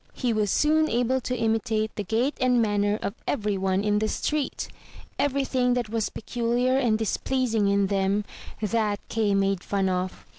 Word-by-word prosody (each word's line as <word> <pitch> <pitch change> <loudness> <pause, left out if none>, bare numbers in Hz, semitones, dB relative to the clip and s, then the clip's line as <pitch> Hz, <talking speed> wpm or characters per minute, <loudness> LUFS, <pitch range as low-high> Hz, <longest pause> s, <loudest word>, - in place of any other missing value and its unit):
He 245 -3 -1
was 210 -2 +1
soon 310 +7 +3
able 245 +2 +1
to 250 +1 -2
imitate 220 -1 0
the 205 - -3
gait 230 +8 0
and 250 -1 +3
manner 205 -1 +1
of 200 - -2
every 210 -5 0
one 190 0 0
in 210 0 +2
the 215 - 0
street. 300 +5 -2 0.5
Everything 260 -3 +1
that 240 -3 -2
was 225 -1 -1
peculiar 240 +2 0
and 240 -5 +2
dis 220 -1 -1
pleasing 235 -6 0
in 200 0 +3
them, 195 +1 0 0.2
— - - -15
that 210 -1 0
Kay 215 -3 +1
made 195 -2 +1
fun 195 -2 0
of. 185 0 -3
220 Hz, 180 wpm, -26 LUFS, 205-250 Hz, 0.5 s, soon